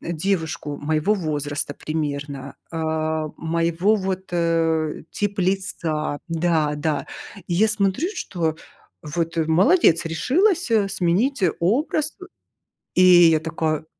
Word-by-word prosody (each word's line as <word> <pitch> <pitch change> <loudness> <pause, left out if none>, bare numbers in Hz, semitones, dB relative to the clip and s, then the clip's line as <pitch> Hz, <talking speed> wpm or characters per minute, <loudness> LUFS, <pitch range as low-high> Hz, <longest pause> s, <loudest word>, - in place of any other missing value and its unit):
девушку 160 -3 -2
моего 155 +7 +1
возраста, 145 -5 -3
примерно, 145 -3 -4
а, 160 -1 -1
моего, 170 +5 +1
вот, 190 -1 -3
э, 165 -2 0
тип 205 -1 -2
лица 170 -6 -1
да, 160 -3 +1
да, 145 -1 -2 0.4
я 185 +6 +3
смотрю, 210 - 0
что, 165 -4 -2 0.5
вот, 165 +2 -3
э, 160 - +2
молодец, 175 - +4
решилась, 330 - +1
э, 210 -3 +3
сменить 195 +7 0 0.2
образ, 295 - 0
э - - -8 0.7
И 185 - +5 0.3
я 155 - +3
такая, 160 -1 -2
165 Hz, 110 wpm, -22 LUFS, 155-195 Hz, 0.7 s, И